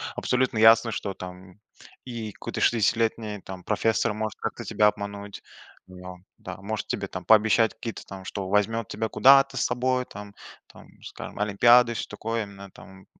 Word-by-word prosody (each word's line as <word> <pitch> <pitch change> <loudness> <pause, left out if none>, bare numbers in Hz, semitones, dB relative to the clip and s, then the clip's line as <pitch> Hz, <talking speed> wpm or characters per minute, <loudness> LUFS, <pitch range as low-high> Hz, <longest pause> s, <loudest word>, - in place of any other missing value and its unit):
Абсолютно 125 -3 0
ясно, 115 +1 +6
что 100 -2 -4
там 90 +1 -11 0.5
и 115 -4 -6
какой-то - - -6
шестидесятилетний 110 -2 +1
там 95 -1 -9
профессор 110 +1 0
может 110 0 -4
как-то - - -5
тебя 105 -1 +2
обмануть, 100 -1 -5 0.4
ну 90 0 -11 0.2
да, 90 -1 -8
может 105 +3 -5
тебе 100 -1 -3
там 95 -1 -7
пообещать 110 +2 +4
какие-то 115 -3 -7
там, 95 -1 -10
что 95 -1 -5
возьмет 105 +2 0
тебя 110 0 -3
куда-то 135 0 +5
с - - 0
собой, 125 +1 0
там 105 0 -11 0.3
там, - - -16 0.2
скажем, - - -9
олимпиады 120 +4 +5
и - - -10
всё - - -4
такое, 115 +2 -3
именно 100 -1 -11
там, 95 0 -15
105 Hz, 165 wpm, -25 LUFS, 100-115 Hz, 0.5 s, ясно